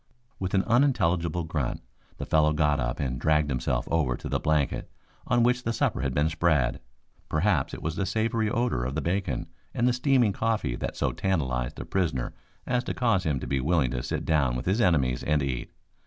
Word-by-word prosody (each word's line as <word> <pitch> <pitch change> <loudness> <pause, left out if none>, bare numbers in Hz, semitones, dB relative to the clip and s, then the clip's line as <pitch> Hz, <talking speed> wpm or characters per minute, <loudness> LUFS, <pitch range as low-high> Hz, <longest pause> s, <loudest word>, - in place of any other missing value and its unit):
With 95 +1 -2
an 95 - +3
unintelligible 90 - +2
grunt 75 -6 -2 0.4
the - - -5
fellow 75 -1 +3
got 75 -2 +2
up 65 -2 -2
and 65 -3 -2
dragged 75 -2 +2
himself 65 -1 -1
over 75 -7 +1
to - - -7
the - - 0
blanket 75 -2 0 0.4
on 120 -1 +3
which 125 +1 +2
the 115 - -1
supper 115 - 0
had 70 -2 -1
been 75 +4 +2
spread. 80 -6 +1 0.5
Perhaps 95 +7 +1
it - - -9
was 80 +1 -2
the 100 - 0
savory 110 +2 0
odor 120 - 0
of 65 +3 -3
the - - 0
bacon 85 -7 -1 0.3
and 120 - +2
the 125 - +3
steaming 125 -4 +3
coffee 110 - 0
that - - -4
so - - +1
tantalized 65 -11 -1
the - - -7
prisoner 80 -10 -1 0.3
as 125 -1 0
to - - -3
cause 115 -7 +1
him 75 -4 0
to - - -4
be 70 - 0
willing 70 -2 +1
to - - -2
sit - - -3
down 70 -6 +2
with 60 - -4
his 100 +6 +1
enemies 70 - +2
and 75 -1 +1
eat. 65 -3 -3
80 Hz, 205 wpm, -27 LUFS, 70-105 Hz, 0.5 s, an